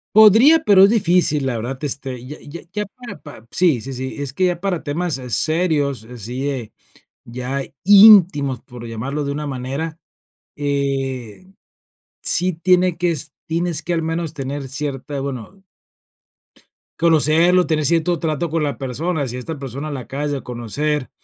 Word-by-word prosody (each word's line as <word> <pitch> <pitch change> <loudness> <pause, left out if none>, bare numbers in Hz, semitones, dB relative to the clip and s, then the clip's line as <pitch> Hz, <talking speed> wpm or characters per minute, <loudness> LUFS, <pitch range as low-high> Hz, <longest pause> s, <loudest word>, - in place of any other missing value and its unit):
Podría, 225 +10 +7
pero 195 -8 +6
es 195 - +7
difícil, 175 -9 +2
la 125 -3 -1
verdad, 120 +4 -4
este, 130 -3 -4
ya 150 +4 -8
ya 160 +4 -9
ya 210 +2 -2
para 245 +3 -11
pa 130 -7 -13
sí, 165 -10 +2
sí, 135 +4 -7
sí, 130 +1 -5
es 140 -2 -4
que 185 - +1
ya 175 -2 0
para 190 -4 -1
temas 160 +1 -2
eh, 125 -1 -8
serios, 145 -4 0
así 125 +4 -5
es, 125 -6 -5 0.5
ya 125 +3 -4 0.2
íntimos, 185 - +7
por 125 -3 -11
llamarlo 135 +6 -4
de 140 - -2
una 150 +1 -4
manera, 140 +5 -4 0.6
eh, 135 - -2 0.8
sí 180 +2 +2
tiene 180 +1 +2
que 175 0 +1
es 150 -2 -4
tienes 165 -1 -2
que 175 - -3
al 165 - 0
menos 165 0 -2
tener 140 -1 -5
cierta, 140 0 -4
bueno 135 - -7 1.4
conocerlo, 165 +2 +4
tener 155 -2 0
cierto 170 +2 +2
trato 160 0 -2
con 160 0 -1
la 145 -1 -1
persona, 145 +3 -2
si 125 +1 -5
esta 150 +4 -6
persona 140 +3 -6
la 140 - -4
acabas 145 +4 -4
de 140 -2 -3
conocer, 130 +4 -3
145 Hz, 160 wpm, -20 LUFS, 135-170 Hz, 1.4 s, Podría